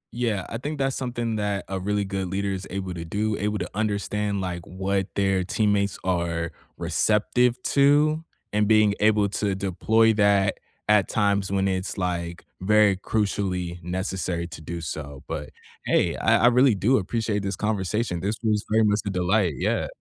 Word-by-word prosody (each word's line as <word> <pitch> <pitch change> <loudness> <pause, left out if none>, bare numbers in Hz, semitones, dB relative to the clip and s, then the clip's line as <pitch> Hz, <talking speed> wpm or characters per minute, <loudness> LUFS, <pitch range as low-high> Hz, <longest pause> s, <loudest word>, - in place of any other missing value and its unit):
Yeah, 115 -6 -1
I 115 - -5
think 150 +3 -4
that's 135 -1 0
something 120 -3 -2
that 100 -1 -2
a 95 0 -3
really 100 +1 -1
good 95 -1 -3
leader 100 +1 -1
is 95 0 -5
able 95 -1 -4
to 85 -1 -6
do, 105 +5 -1
able 105 +1 -1
to - - -3
understand, 105 -1 -1
like, 90 -2 -3
what 95 +1 -2
their 95 -2 +1
teammates 100 0 +1
are 85 -2 -1 0.3
receptive 120 +3 +1
to 150 +3 +3 0.3
and 105 -1 +2
being 110 -2 +5
able 105 -1 +3
to 100 -1 -1
deploy 110 +4 +2
that 100 -2 +3 0.3
at 105 -2 +4
times 100 -3 +1
when 95 0 +1
it's, 95 +1 -2
like, 85 -2 -3 0.2
very 105 0 +4
crucially, 95 -4 -2
necessary 90 -1 -3
to 80 - -9
do 85 +2 -6
so, 70 -3 -6
but, 75 - -5 0.4
hey, - - +2
I - - +3
I - - +8
really 125 -2 +4
do 120 +7 +3
appreciate 105 +1 -1
this 95 -1 -2
conversation, 105 -2 -1
this 105 +3 -1
was 105 -1 +1
very 110 0 +4
much 105 0 +2
a - - +1
delight, 90 -2 +1
yeah. - - 0
100 Hz, 170 wpm, -25 LUFS, 95-110 Hz, 0.4 s, I